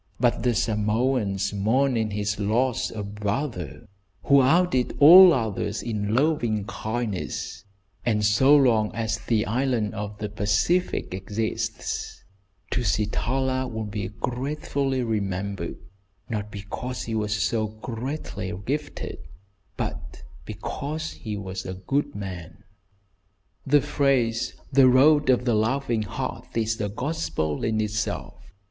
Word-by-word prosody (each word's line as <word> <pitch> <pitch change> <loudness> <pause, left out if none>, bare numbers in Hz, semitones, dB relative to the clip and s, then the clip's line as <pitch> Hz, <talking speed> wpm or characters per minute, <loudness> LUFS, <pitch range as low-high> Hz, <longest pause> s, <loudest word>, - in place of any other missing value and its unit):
But 120 -1 +2
the 120 -1 +1
Samoans 105 -2 0
mourn 120 +7 +2
in 110 -2 0
his 105 0 -2
loss 115 +5 +1
a 110 -2 -5
brother, 105 - -4 0.4
who 140 -1 +6
outdid 140 -2 +2
all 175 +5 +10
others 110 - -1
in 105 -2 -2
loving 120 -8 +1
kindness, 110 -4 -4 0.4
and 105 -3 +1
so 130 +8 +5
long 115 -7 +4
as 110 -1 -1
the 110 0 0
island 120 -2 0
in 105 0 -4
the 105 - -3
Pacific 105 - 0
exists, 105 +4 -3 0.5
Tusitala 125 +5 0
will 110 0 -3
be 105 -1 -4
gratefully 135 +4 -2
remembered, 100 -5 -2 0.5
not 105 -2 -3
because 105 +5 -5
he 115 - -4
was 105 -1 0
so 110 +1 0
greatly 110 -1 -5
gifted, 145 +2 -4 0.6
but - - -5 0.2
because 150 +9 -4
he 105 -3 -6
was 95 -1 -5
a 95 - -5
good 135 +10 -2
man. 90 -4 -7 1.0
The 145 +1 +5
phrase, 125 -6 +1 0.2
"The 135 -1 +6
Road 145 +3 +5
of 125 -1 +3
the 120 - +2
Loving 115 +1 +1
Heart," 105 +2 -5
is 110 -1 0
a 105 - -1
gospel 115 - -2
in 110 -1 0
itself. 105 0 -3
110 Hz, 120 wpm, -25 LUFS, 105-130 Hz, 1.0 s, all